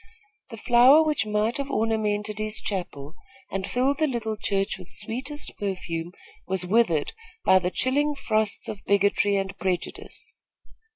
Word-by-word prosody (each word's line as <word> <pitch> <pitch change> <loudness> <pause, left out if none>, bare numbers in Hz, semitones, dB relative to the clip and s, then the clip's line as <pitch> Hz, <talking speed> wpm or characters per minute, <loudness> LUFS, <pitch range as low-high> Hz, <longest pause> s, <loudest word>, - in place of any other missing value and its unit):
The 225 - -8
flower 250 +7 +6
which 300 -9 0
might 210 +2 0
have 280 -1 -3
ornamented 215 -3 -1
his 215 0 -1
chapel 155 -7 -5 0.4
and 195 -1 -3
filled 270 +3 +1
the 310 - +3
little 225 -5 -2
church 195 -2 -1
with 180 - -12
sweetest 260 +6 -3
perfume 175 -4 -3 0.4
was 185 -1 0
withered 180 -7 +2 0.3
by 190 - +6
the 180 -1 -1
chilling 290 +8 +1
frosts 220 -5 -1
of 205 - -6
bigotry 200 0 +3
and 195 0 -2
prejudice. 190 - -4
215 Hz, 140 wpm, -25 LUFS, 190-250 Hz, 0.4 s, flower